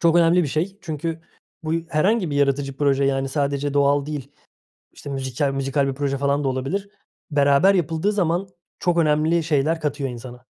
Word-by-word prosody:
Çok 170 0 +4
önemli 170 +1 +5
bir 145 - -1
şey 180 +8 -2
çünkü 160 0 -4 0.4
bu 155 0 -2 0.2
herhangi 185 +3 +1
bir 145 - -2
yaratıcı 140 -1 +1
proje, 140 -1 +2
yani, 135 0 0
sadece 140 0 -1
doğal 140 0 +3
değil, 145 -2 -6 0.6
işte, 145 - -10
müzikal 135 +1 -1
müzikal 135 0 0
bir 135 - -1
proje 140 -1 -1
falan 140 +1 0
da - - 0
olabilir. 135 +10 -2 0.4
Beraber 145 +6 +4
yapıldığı 165 +3 0
zaman 185 -1 0 0.3
çok 175 -1 +1
önemli 160 +1 +2
şeyler 155 +1 +1
katıyor 145 -2 -2
insana. 125 +1 -9
145 Hz, 170 wpm, -22 LUFS, 140-165 Hz, 0.6 s, önemli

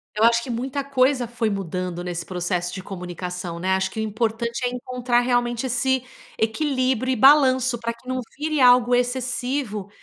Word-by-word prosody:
Eu 215 - +3
acho 235 0 +4
que 255 - -8
muita 265 +4 -3
coisa 260 -2 +2
foi 230 -1 -2
mudando 180 -2 -4
nesse 175 -2 -4
processo 180 -1 -2
de 190 - -6
comunicação, 180 -2 -6
né. 190 +1 +1
Acho 190 - 0
que 220 - -6
o - - 0
importante 230 +3 -2
é - - +1
encontrar 250 -1 -1
realmente 245 0 0
esse 260 +1 +1 0.3
equilíbrio 255 +1 0
e - - -1
balanço 260 -2 +5
pra 235 0 -3
que 235 +2 -21
não 255 0 -2 0.2
vire 305 0 -1
algo 245 -1 +6
excessivo 245 -3 -1
240 Hz, 175 wpm, -23 LUFS, 200-255 Hz, 0.3 s, algo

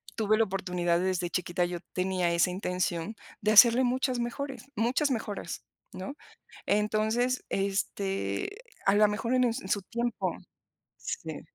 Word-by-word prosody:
tuve 215 -1 +2
la 225 - +5
oportunidad. 180 -3 0
Desde 185 -1 0
chiquita 175 0 0
yo 175 0 -4
tenía 185 -2 0
esa 170 +2 +3
intención 180 +1 -2 0.3
de 210 0 +2
hacerle 235 +3 +8
muchas 255 0 +1
mejores 255 +3 -4
muchas 245 +7 +2
mejoras, 210 -7 -4 0.3
¿no? 185 +7 -6 0.5
Entonces, 220 +4 +1
este, 195 - -1 0.4
a 195 - +4
la 210 0 +6
mejor, 225 +4 -1
en 255 -1 +4
un 235 - +1
en 190 - -9
su 200 - +1
tiempo, 235 +3 -2 0.6
sí, - - -5
210 Hz, 140 wpm, -29 LUFS, 185-235 Hz, 0.6 s, hacerle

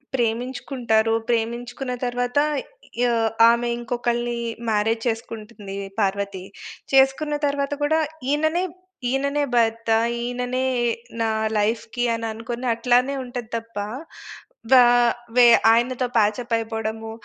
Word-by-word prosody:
ప్రేమించుకుంటారు, 235 -1 0 0.2
ప్రేమించుకున్న 240 +2 -2
తరువాత 245 +2 0 0.6
య - - +4 0.4
ఆమె 235 +1 +2
ఇంకొకళ్నీ 240 0 -2 0.3
మ్యారేజ్ 220 +1 +1
చేసుకుంటుంది 220 -3 -5 0.2
పార్వతి. 200 -2 -1 0.5
చేసుకున్న 270 +3 +3
తరువాత 280 0 -1
కూడా 315 +2 +2 0.3
ఈయననే 315 +4 +1 0.5
ఈయననే 280 +2 0
భర్త, 230 -1 +1 0.3
ఈయననే 250 +1 -2 0.6
నా 225 - +1 0.3
లైఫ్‌కి 225 +3 -1
అననుకోని 230 +2 -4
అట్లానే 250 +3 +2
ఉంటది 245 -2 -6
తప్ప. 230 -1 -10 0.9
వా 255 -1 +9 0.5
వె 245 -1 +8 0.2
ఆయనతో 240 +2 +2
ప్యాచ్‌అప్ 225 +3 +1
అయిపోవడము. 225 0 -4
240 Hz, 95 wpm, -23 LUFS, 225-255 Hz, 0.9 s, వా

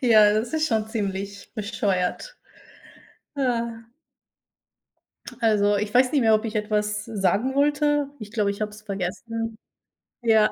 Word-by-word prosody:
Ja, 215 -5 +6
das 220 +3 -1
ist 315 0 +1
schon 220 -1 +1
ziemlich 200 -2 -4
bescheuert, 205 - -2 1.0
ja. 235 -4 -1 1.6
Also, 205 -2 +3
ich 210 +1 -3
weiß 250 0 +5
nicht 290 - +2
mehr, 220 -2 +5
ob 215 +2 -1
ich 220 - -5
etwas 210 -1 -1
sagen 220 +4 0
wollte. 290 0 +2
Ich 210 -2 -9
glaube, 210 -3 +1
ich 200 - -8
habe 210 0 -1
es 210 0 -12
vergessen. 220 +3 -4 0.7
Ja 220 -2 +4
215 Hz, 135 wpm, -24 LUFS, 210-235 Hz, 1.6 s, Ja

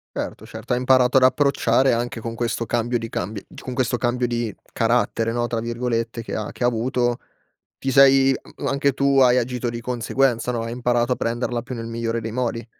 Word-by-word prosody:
Certo, - - -5
certo, 110 +3 -4
hai - - 0
imparato 130 0 +3
ad 130 - +6
approcciare 130 -1 +3
anche 120 0 -3
con 115 0 -5
questo 115 0 -2
cambio 120 +1 0
di 115 - -6
cambi 100 0 -4 0.2
con 130 - -6
questo 125 -1 0
cambio 125 0 0
di 120 -3 -2 0.2
"carattere", 115 -1 +1
no, 120 0 0
tra 120 -1 -2
virgolette, 115 0 -2
che - - -6
ha 110 - -4
che - - -4
ha - - +5
avuto. 120 +1 0 0.6
Ti 135 - -2
sei 135 0 +6
a - - -7
anche 140 0 +2
tu 140 +1 +2
hai 125 -1 +5
agito 125 0 -2
di 115 0 -5
conseguenza, 125 +1 0
no, 115 -2 -2
hai 115 - -5
imparato 120 0 +1
a - - +3
prenderla 120 0 -2
più 125 +1 -7
nel 115 0 -5
migliore 115 0 -2
dei 110 0 -5
modi. 115 -2 -2
120 Hz, 205 wpm, -22 LUFS, 115-125 Hz, 0.6 s, ad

